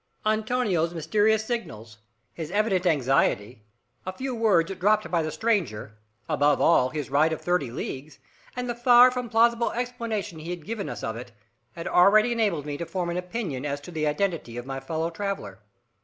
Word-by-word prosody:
Antonio's 215 -6 0
mysterious 210 +7 +2
signals, 110 - -5 0.3
his 160 -2 -6
evident 195 -2 +1
anxiety, 130 - +1 0.4
a 185 - -4
few 260 +7 -5
words 195 -6 +2
dropped 210 -2 +2
by 170 -2 +2
the 155 - -2
stranger, 155 - -1 0.3
above 145 -2 +2
all, 130 -6 +4
his 150 -2 -5
ride 155 +3 +3
of 160 - -3
thirty 175 -8 0
leagues, 135 +4 -6 0.4
and 250 0 -3
the 240 - -1
far 245 +1 +6
from 250 -1 -4
plausible 235 +1 +3
explanation 230 -7 -4
he 160 +2 -8
had 175 -3 -6
given 220 -1 -4
us - - -7
of 110 - -3
it, 120 0 -9 0.4
had 165 - -6
already 215 +6 +5
enabled 205 -11 0
me 145 -1 -4
to 170 - -3
form 180 -2 -2
an 170 - -3
opinion 180 - -4
as 145 -1 -3
to 145 +5 -11
the 155 -2 -1
identity 150 -7 -2
of 120 - -6
my 135 0 -5
fellow 160 +4 -3
traveller. 165 - -5
175 Hz, 180 wpm, -26 LUFS, 145-220 Hz, 0.4 s, far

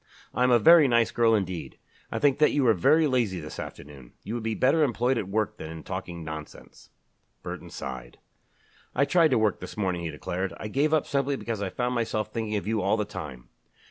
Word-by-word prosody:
"I 125 - -2
am 125 - +4
a 120 - +6
very 160 +2 +7
nice 120 -2 +3
girl 115 -1 +3
indeed. 95 -4 -3 0.3
I - - -2
think 145 -1 +2
that 150 - +5
you 145 -3 +1
are 115 - +6
very 155 - +4
lazy 120 -10 0
this 75 -1 -8
afternoon. 70 -4 -10
You 110 - -5
would 120 - -3
be 110 0 -2
better 140 +8 +3
employed 125 -1 +1
at 95 - -4
work 110 +1 -1
than 80 - -7
in 80 0 -8
talking 90 -2 -6
nonsense." 80 -1 -10 0.5
Burton - - -7
sighed. 65 -3 -7 0.8
"I 140 - +3
tried 165 +2 +4
to 130 - +3
work 110 -2 +1
this - - -9
morning," 95 -4 -1
he 85 - -3
declared. 90 +4 -4
"I 105 - -6
gave 145 +7 +1
up 155 -2 +2
simply 140 0 0
because 115 -5 -4
I 100 - -2
found 125 +5 -2
myself 110 -3 -2
thinking 110 -2 -2
of 100 - -2
you 110 0 0
all 100 +4 +2
the 105 - -1
time. 65 -11 -8
110 Hz, 220 wpm, -27 LUFS, 90-125 Hz, 0.8 s, very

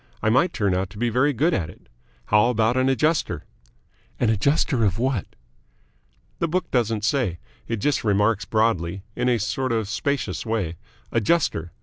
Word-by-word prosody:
I 110 - +3
might 165 +9 +3
turn 100 - 0
out 95 0 -1
to 105 - -13
be 120 +2 0
very 125 +6 +2
good 155 +7 +1
at 85 - -1
it. - - -16 0.4
How 105 +3 +4
about 115 0 +2
an 130 +1 +2
Adjuster?" 150 +4 +1 0.8
"An 115 -3 +3
adjuster 125 +3 +1
of 100 -2 +1
what?" 125 -4 -1 1.1
"The 170 - +1
book 180 +3 -2
doesn't 115 -4 0
say. 110 - 0 0.3
It 115 - -2
just 145 +7 0
remarks 105 0 +2
broadly 100 -5 0
in 125 0 +1
a 120 - +3
sort 130 +4 -2
of 110 -3 0
spacious 140 +6 -2
way 110 -8 -2 0.4
'Adjuster.' 115 - +1
115 Hz, 165 wpm, -23 LUFS, 105-130 Hz, 1.1 s, How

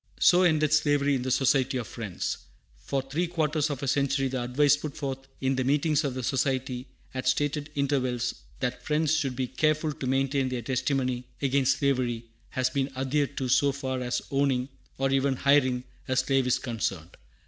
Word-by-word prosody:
So 180 0 +6
ended 155 -4 +3
slavery 145 -2 +3
in 130 - 0
the 130 - -2
Society 130 0 +2
of 120 - -3
Friends. 105 -6 -4 0.4
For 135 -1 -2
three 150 +7 -1
quarters 155 -3 0
of 140 -2 -4
a - - -1
century 140 0 +1
the 130 -1 -2
advice 140 +4 +4
put 145 -1 -6
forth 135 -2 -4
in 135 0 +1
the 130 - 0
meetings 150 +3 +2
of 135 -3 -2
the 130 - -4
Society 130 -1 -1 0.3
at 130 -1 -3
stated 145 +2 0
intervals, 130 -4 0 0.3
that 125 0 -2
Friends 155 0 +1
should 135 -5 -1
be 130 +1 -1
"careful 155 +3 +1
to 135 - -5
maintain 135 0 +1
their 125 -2 -3
testimony 130 0 -1
against 135 -1 +2
slavery," 125 -4 0 0.2
has 130 0 0
been 135 0 0
adhered 140 +2 -1
to 130 - -1
so 140 +3 +4
far 130 -2 -3
as 125 0 -2
owning, 135 -2 +1 0.3
or 135 0 +1
even 135 0 +2
hiring, 130 -2 +3 0.2
a 130 - 0
slave 135 0 +2
is 125 +1 +3
concerned. 100 - -4
135 Hz, 180 wpm, -27 LUFS, 130-145 Hz, 0.4 s, So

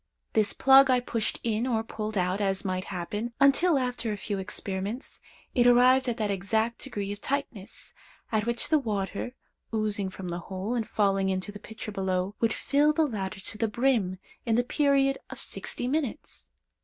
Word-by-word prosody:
This 215 -2 +2
plug 270 0 +7
I 255 -1 +5
pushed 230 -2 -2
in 230 +1 0
or 225 -3 0
pulled 215 -1 -4
out, 185 +2 0
as 195 0 0
might 185 -1 -2
happen, 205 +7 -4
until, 285 +4 +5
after 250 -3 -2
a 210 - -3
few 200 -1 -3
experiments, 195 +5 -5 0.3
it 245 -1 +4
arrived 250 +1 +5
at 235 - -2
that 210 -2 0
exact 220 +4 0
degree 205 -7 -4
of 205 +1 -7
tightness, 265 -8 -4 0.4
at 220 0 0
which 235 0 0
the 310 0 +4
water, 210 0 -3 0.4
oozing 215 -3 0
from 185 -1 -7
the 175 0 -3
hole, 190 +5 -4
and 230 -3 -2
falling 195 -2 +2
into 190 +2 -2
the 205 - -10
pitcher 220 0 -8
below, 190 -1 -1
would 230 -1 +2
fill 290 +6 +2
the 315 +1 +3
latter 195 -8 -4
to 210 - -5
the 225 - +2
brim 220 -5 +1 0.3
in 225 -2 +1
the 245 - +3
period 275 0 +2
of - - -7
sixty 245 - +2
minutes. 295 0 -3
220 Hz, 180 wpm, -28 LUFS, 195-250 Hz, 0.4 s, plug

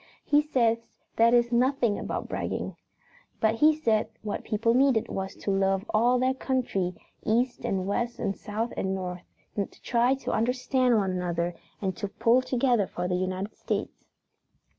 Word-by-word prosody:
He 295 0 +4
says 230 -6 +1 0.3
that 230 +1 +6
is 240 0 +3
nothing 245 -3 +2
but - - -3
bragging. - - -3 0.6
But 220 0 +3
he 300 +7 +4
said 225 -8 +1
what 210 - -3
people 225 +2 +1
needed 255 -3 +3
was 190 0 -4
to 200 - -3
love 195 +1 +1
all 240 +4 +4
their 255 +1 +2
country, 245 -9 -1 0.3
east 240 +3 +1
and 190 -1 -1
west 235 +4 -1
and 200 -4 -2
south 220 +3 -4
and 190 0 -1
north, 180 -1 -4 0.4
to 200 - 0 0.2
try 245 +2 +3
to 270 - -4
understand 250 +1 +2
one 195 -3 +1
another 175 -1 -1 0.3
and 190 -2 -1
to 205 - -3
pull 230 +5 +3
together 245 -5 +1
for 175 +3 -3
the 180 - -1
United 185 +3 -2
States. - - -4
225 Hz, 160 wpm, -27 LUFS, 195-250 Hz, 0.6 s, that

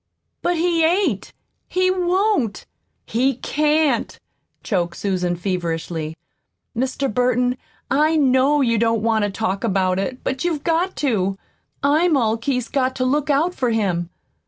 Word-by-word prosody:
"But 350 - +1
he 335 0 +2
ain't 325 - +1 0.4
he 370 0 +1
won't 370 - 0 0.4
he 255 +4 +1
can't," 300 -1 0 0.4
choked 175 -5 -1
Susan 180 -3 -1
feverishly. 170 -3 -3 0.6
"Mr. 260 +1 -1
Burton, 250 +1 +2 0.4
I 305 +3 +3
KNOW 275 0 +3
you 230 -3 +2
don't 230 -1 +1
want 220 -2 +2
to - - -1
talk 195 -1 -2
about 185 -1 +1
it, 255 +6 -4
but 265 0 -2
you've 325 -5 -1
got 340 +3 0
to. 195 -6 0 0.5
I'm 305 +3 +3
all 225 -3 +2
Keith's 250 0 -2
got 260 -1 0
to 255 - -1
look 290 +3 0
out 310 +5 +2
for 255 -8 -1
him." 185 -7 0
255 Hz, 140 wpm, -21 LUFS, 200-300 Hz, 0.6 s, I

